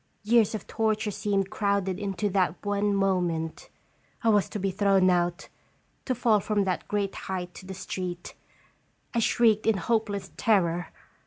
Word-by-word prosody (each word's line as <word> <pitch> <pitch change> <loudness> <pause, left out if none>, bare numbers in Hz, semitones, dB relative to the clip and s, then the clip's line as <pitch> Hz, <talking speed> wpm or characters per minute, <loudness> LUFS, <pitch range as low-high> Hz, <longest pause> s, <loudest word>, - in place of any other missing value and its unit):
Years 220 0 +3
of 215 - -6
torture 220 -1 0
seemed 195 -1 -1
crowded 200 -3 0
into 200 0 -2
that 185 -4 +1
one 205 0 +1
moment. 175 -5 -1 0.5
I 230 - +3
was 205 -3 +3
to - - -4
be 195 0 0
thrown 195 -1 +3
out, 175 -1 0 0.6
to 255 - 0
fall 225 -3 +3
from 205 0 0
that 185 -2 -2
great 200 -1 -1
height 180 -2 -5
to 185 - -11
the 190 - -6
street. 180 -1 -5 0.8
I 235 - +1
shrieked 225 -1 +3
in 220 -3 +4
hopeless 200 -1 -1
terror. 175 -5 +2
200 Hz, 155 wpm, -27 LUFS, 185-215 Hz, 0.8 s, in